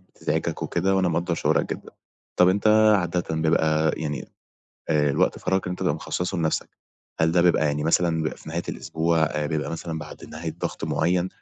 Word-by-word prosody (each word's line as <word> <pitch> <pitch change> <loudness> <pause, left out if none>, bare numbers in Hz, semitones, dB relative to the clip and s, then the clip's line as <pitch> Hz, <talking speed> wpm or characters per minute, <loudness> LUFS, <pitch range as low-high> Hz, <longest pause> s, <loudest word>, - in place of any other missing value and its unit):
بتزعِجك - - -2
وكده 95 +3 0
وأنا 95 -2 +2
مقدّر 85 +1 0
شعورك - - +1
جدًا. - - -11 0.5
طب 90 0 +6
أنت 100 +3 +1 0.3
عادةً 90 -1 -1
بيبقى 80 -1 +2
يعني، 75 -4 -4 0.6
آآ، 75 -2 +3
الوقت - - +1
فراغك 95 0 0
اللي 90 - -2
أنت 90 - -8
تبقى - - +1
مخصّصه 90 0 -3
لنفسك 80 -1 0 0.5
هل 80 0 +3
ده 85 0 +4
بيبقى 85 -2 +3
يعني 75 +1 -1
مثلًا 85 0 +2
بيبقى 80 - -3
في - - -12
نهاية 85 +2 -2
الأسبوع، 80 +1 -1
آآ 75 0 -2
بيبقى 75 -1 -2
مثلًا 85 -1 -4
بعد 75 - -9
نهاية 80 +1 -6
ضغط - - -3
معيّن، 85 +4 +1
80 Hz, 185 wpm, -24 LUFS, 80-90 Hz, 0.6 s, طب